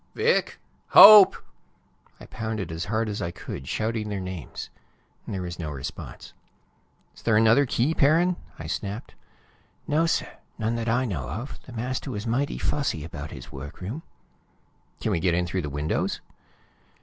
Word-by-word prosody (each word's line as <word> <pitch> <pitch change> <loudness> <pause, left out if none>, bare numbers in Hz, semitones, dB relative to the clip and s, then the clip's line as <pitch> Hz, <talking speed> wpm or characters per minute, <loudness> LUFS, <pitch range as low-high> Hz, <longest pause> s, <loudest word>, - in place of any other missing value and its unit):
"Vic! 465 +3 +1 0.4
Hope!" 205 -1 +11 0.8
I - - -11
pounded 110 -6 -4
as 80 +2 -4
hard 110 +2 -1
as 105 -1 -4
I 85 - -2
could, 65 -5 -8
shouting 110 -1 -2
their 100 -1 -3
names. 90 -4 -7 0.6
There 95 -2 -4
was 85 -1 -6
no 80 -2 -4
response. 70 -3 -8 0.8
"Is - - -16
there 110 -2 +3
another 115 +5 +5
key, 130 +6 +1
Perrin?" 165 +5 +3 0.2
I 80 - -8
snapped. 100 +6 -5 0.7
"No, 160 +3 +2
sir; - - -1 0.2
none 115 0 -1
that 115 -1 -2
I 125 +3 +2
know 75 - -4
of. 115 - -6
The - - -10
master 125 +4 -3
was 105 -3 -5
mighty 130 +5 -1
fussy 140 - -1
about 75 -2 -7
his - - -10
workroom." 85 - -7 1.0
"Can - - -1
we 85 - +1
get 85 0 +1
in 90 0 +1
through 90 +2 -2
the 75 - -4
windows?" 75 +2 -2
110 Hz, 160 wpm, -25 LUFS, 85-130 Hz, 1.0 s, Hope